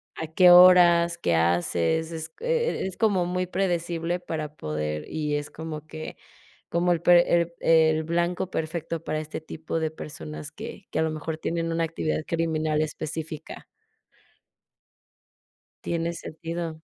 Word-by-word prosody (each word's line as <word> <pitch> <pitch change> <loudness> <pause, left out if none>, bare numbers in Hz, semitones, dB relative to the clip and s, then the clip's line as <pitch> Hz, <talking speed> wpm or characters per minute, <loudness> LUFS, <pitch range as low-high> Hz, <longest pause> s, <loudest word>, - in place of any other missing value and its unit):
A 160 - -4
qué 180 +3 +5
horas, 175 -1 +7
qué 85 - +1
haces, 85 - +1
es, 160 -1 -5
eh 485 -1 0
eh, - - -1
es 190 - -8
como 200 -6 +2
muy 180 +1 -1
predecible 175 -2 -1
para 155 -3 -5
poder, 75 0 -3
y 150 -2 -2
es 145 0 -3
como 155 -1 -7
que, 155 0 -8 0.5
como 175 +1 +1
el 170 -1 +1
pre 175 0 +5
el 170 0 -4
el 160 -1 +4
blanco 175 +3 -1
perfecto 165 0 -3
para 155 0 -2
este 155 0 -6
tipo 160 +1 -4
de 160 -1 -1
personas 75 - -8
que - - -9
que - - -1
a - - +3
lo 160 - 0
mejor 155 +1 -4
tienen 165 0 -2
una 165 0 +1
actividad 160 -1 -2
criminal 155 -2 0
específica. 155 +1 -5 2.2
Tiene 170 0 -1
sentido. 165 0 -6
160 Hz, 150 wpm, -26 LUFS, 155-170 Hz, 2.2 s, horas